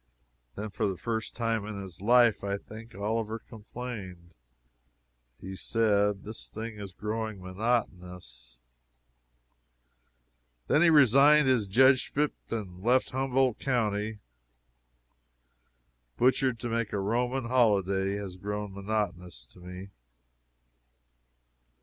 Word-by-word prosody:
Then, 105 0 -5
for 105 - -1
the 95 -2 -3
first 110 +5 -4
time 115 -2 -1
in 105 -1 -6
his 95 -3 -10
life, 120 0 +4
I 100 0 -1
think, 110 +1 -12
Oliver 110 +2 -2
complained. 105 -6 -9 1.1
He 95 +1 -7
said, 105 -2 +1
"This 110 +1 -6
thing 110 0 -7
is 100 -2 -7
growing 110 +1 -4
monotonous!" 90 - -4 2.1
Then 150 - +3
he 175 - +6
resigned 145 0 +6
his 120 -6 +2
judgeship 130 +6 +3 0.2
and 95 -5 -5
left 125 +5 +2
Humboldt 130 -2 +1
county. 110 -4 -1 2.0
"Butchered 130 0 +2
to 120 - -3
make 115 -1 -1
a 100 - 0
Roman 120 +5 -1
holyday" 100 -5 +2
has 100 -3 -6
grown 105 +1 -4
monotonous 95 - -3
to 90 - -20
me. 90 +2 -9
105 Hz, 105 wpm, -29 LUFS, 95-120 Hz, 2.1 s, he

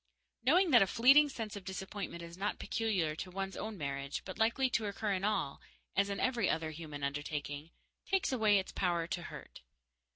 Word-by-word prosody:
Knowing 340 +7 +4
that 240 -4 +8
a 195 - +5
fleeting 275 +8 +6
sense 225 -5 -5
of 200 - -7
disappointment 190 -2 -5
is 170 0 -9
not 200 +3 -2
peculiar 190 -9 0
to 180 - -5
one's 195 +1 -4
own 215 -1 -5
marriage, 140 -2 -3
but 185 - -7
likely 230 +4 +3
to 230 -4 0
occur 205 0 -1
in 190 0 -2
all, 200 -9 0 0.3
as 200 +1 +2
in 200 - -2
every 240 -6 +1
other 160 -1 -1
human 150 -2 -7
undertaking, 145 +1 -3 0.4
takes 385 -6 +1
away 215 -5 +4
its 190 - -2
power 175 -3 0
to 175 +1 -3
hurt. - - -10
195 Hz, 190 wpm, -34 LUFS, 165-225 Hz, 0.4 s, that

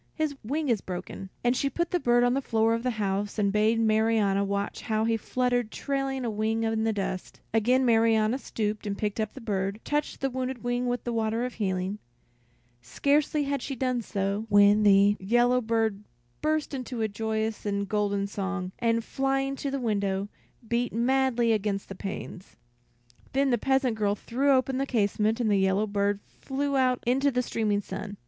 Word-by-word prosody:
His 310 -3 -1
wing 295 +7 -2
is 225 -5 +2
broken." 185 +1 -6
And 245 +1 +3
she 275 - 0
put 340 +5 -2
the 355 - +1
bird 240 -4 +3
on 245 0 +3
the 275 - 0
floor 225 -3 +2
of 230 - -1
the 250 - 0
house 200 0 -1
and 200 -2 +1
bade 215 +2 +3
Marianna 220 -3 +2
watch 200 0 -2
how 220 0 0
he 230 0 +2
fluttered 245 0 0
trailing 270 0 -2
a - - 0
wing 220 +2 0
in 225 0 0
the 225 - +2
dust. 195 -3 -4
Again 250 +4 +3
Marianna 225 +1 +3
stooped, 215 -4 -3
and 200 0 -2
picking 210 +1 -2
up 215 - -4
the - - -7
bird, 200 -2 -2
touched 295 0 -2
the 270 -1 -1
wounded 255 -1 -4
wing 245 +1 -1
with 245 -1 -1
the 240 - -3
water 225 +1 0
of 250 - -5
healing. 190 -1 -2 0.8
Scarcely 290 - +1
had 280 0 -2
she 275 - -4
done 255 -1 0
so, 200 +1 -2
when 205 +1 +6
the 205 0 +5
yellow 240 +5 +3
bird 220 -3 0 0.4
burst 310 -1 0
into 255 -3 -3
a - - +2
joyous 220 +1 -2
and 200 -1 -1
golden 200 -1 0
song, 195 -2 -3
and 230 -1 +1
flying 270 +2 -1
to 280 - -3
the 275 0 -2
window, 200 -4 -1 0.4
beat 240 +1 0
madly 240 0 +2
against 205 -2 -2
the - - -5
panes. 190 - -7 0.8
Then 270 0 +2
the 240 - +3
peasant 265 -2 +1
girl 205 -1 +2
threw 260 +7 -1
open 260 0 +2
the 275 - -1
casement, 215 -1 +1
and 225 -3 +1
the 200 - +4
yellow 190 +2 +2
bird 200 -1 0 0.2
flew 280 +1 -2
out 255 -2 +2
into 270 +4 +3
the 250 -2 0
streaming 210 -4 0
sun. 200 +1 -7
225 Hz, 190 wpm, -27 LUFS, 205-255 Hz, 0.8 s, when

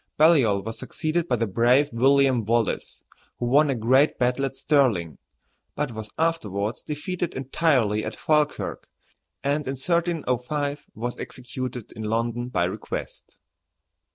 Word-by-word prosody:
Baliol 135 - +4
was 115 +1 -6
succeeded 160 +2 -2
by 125 - +2
the 115 -1 0
brave 120 +7 +3
William 135 0 +4
Wallace, 115 0 -1 0.3
who 120 - -2
won 145 +5 +4
a 135 - +1
great 130 +6 +3
battle 125 +2 +1
at 135 - -4
Stirling, 125 - +1 0.6
but 150 -4 -2
was 110 -1 -7
afterwards 110 - -1
defeated 170 +3 -4
entirely 130 -6 +1
at - - -4
Falkirk, 150 -1 0 0.6
and 145 +1 0
in 135 - -1
1305 145 -3 -1
was 120 +2 -3
executed 125 -2 -6
in 110 - -9
London 115 +3 -1
by 85 - +1
request. 90 - -5
130 Hz, 130 wpm, -25 LUFS, 115-150 Hz, 0.6 s, Baliol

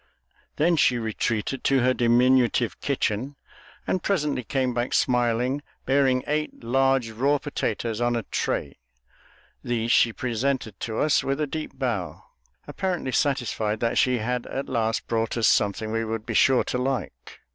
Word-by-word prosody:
Then 165 +2 +2
she 125 -5 +3
retreated 110 +2 -2
to 135 -1 +3
her 130 +1 +3
diminutive 125 0 +3
kitchen, 125 +7 -1 0.5
and 185 - -1
presently 150 -10 0
came 130 +2 -1
back 120 +1 -1
smiling, 125 +2 +1 0.2
bearing 135 -2 +2
eight 150 -3 -3
large 135 -1 +2
raw 135 +6 +1
potatoes 120 -5 -3
on 120 0 +1
a 115 - -2
tray. - - -3 0.8
These 115 -1 -1
she 120 - +5
presented 120 -2 -2
to 110 -1 -4
us 150 -1 +2
with 135 +1 -1
a 150 - +1
deep 155 -2 -6
bow, 120 -9 -3 0.4
apparently 180 -8 -2
satisfied 115 -5 0
that 115 0 +1
she 125 -1 +3
had 120 +2 -2
at 135 - -4
last 110 -1 -1
brought 115 0 -1
us 115 - +3
something 105 +1 +1
we 115 0 0
would 110 -1 -4
be - - -4
sure 130 -1 +4
to 125 - -2
like. 130 +1 -4
125 Hz, 155 wpm, -25 LUFS, 115-135 Hz, 0.8 s, she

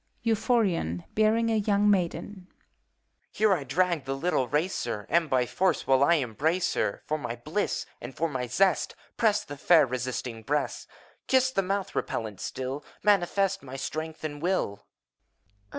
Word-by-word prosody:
EUPHORiON 215 - +1
(bearing 225 +1 +3
a 220 - +2
young 205 -1 +2
Maidek). 190 0 0 0.8
Here 215 -2 +3
I 170 - -1
drag 165 +2 0
the 135 0 -2
little 135 -3 0
racer, 145 - -1
And 165 -2 +2
by 130 -2 +2
force 180 +6 0
will 135 0 +4
I 170 +4 +5
embrace 155 - 0
her; - - -1
For 155 0 -1
my 120 -5 -4
bliss 150 - -2 0.2
and 120 0 -8
for 165 - +1
my 130 -5 -3
zest 190 +9 +2 0.2
Press 215 -2 +2
the 145 - -9
fair, 160 +1 +5
resisting 125 -2 -4
breast. 145 +6 -2 0.4
Kiss 260 0 +3
the 195 - +1
mouth, 195 +1 -2
repellent 105 -4 -3
still, 130 +3 -4
— - - -30
Manifest 195 -1 +2
my 135 -1 -9
strength 155 +4 -5
and 145 -2 -5
will. 165 - -1
160 Hz, 155 wpm, -28 LUFS, 130-195 Hz, 0.8 s, I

